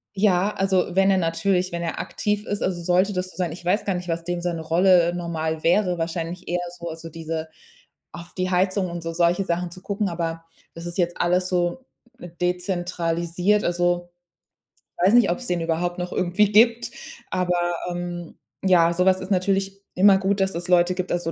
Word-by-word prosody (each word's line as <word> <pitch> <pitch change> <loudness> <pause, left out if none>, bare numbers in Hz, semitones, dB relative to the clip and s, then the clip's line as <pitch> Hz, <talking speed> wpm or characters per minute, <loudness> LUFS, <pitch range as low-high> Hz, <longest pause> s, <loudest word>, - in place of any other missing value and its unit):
Ja, 195 0 +2
also, 190 -2 +1
wenn 195 0 +4
er 190 - +3
natürlich 180 +2 0
wenn 170 0 -3
er 165 - -3
aktiv 210 +4 -2
ist 205 - -3
also, 175 -2 -1
sollte 185 +4 +2
das 185 0 -2
so - - -18
sein, 180 -3 -1
ich 170 +2 -9
weiß 180 +5 +1
gar 195 - 0
nicht, 180 0 -5
was 165 0 -2
dem 175 0 -3
seine 170 -2 -2
Rolle, 175 +1 +4
äh, - - -3
normal 160 -2 -3
wäre, 180 +1 +2
wahrscheinlich 170 +1 -4
eher 175 +1 0 0.2
so, 170 -1 -6
also, 165 0 -8
diese 160 0 -5 0.6
auf 170 +1 -10
die 185 0 0
Heizung 185 +1 +1
und 170 -1 -6
so 165 0 -4
solche 175 +3 +2
Sachen 175 +1 -1
zu 185 - -12
gucken, 200 -1 -1
aber 165 -1 -4 0.3
das 165 +1 -9
ist 175 - -6
jetzt 175 -1 0
alles 180 +1 +2
so 180 +8 -1 0.6
dezentralisiert. 175 +1 0
Also, 175 0 0 0.9
weiß 190 +4 +5
nicht, 240 -7 +5
ob's 245 +8 -4
den 175 -1 -1
überhaupt 170 +2 -1
noch 180 0 -4
irgendwie 190 +3 +2
gibt, 230 +2 +4 0.4
aber, 175 -1 0 0.2
ähm 175 -1 -5 0.3
ja, 170 -3 +5
so 180 +2 +1
was 190 0 +3
ist 185 +2 -7
natürlich 195 +1 0
immer 195 +1 +6
gut, 195 +1 0
dass 190 0 +1
es 175 +1 -4
Leute 180 0 +4
gibt, 185 0 -3
also, 175 -1 -1
180 Hz, 195 wpm, -23 LUFS, 170-190 Hz, 0.9 s, immer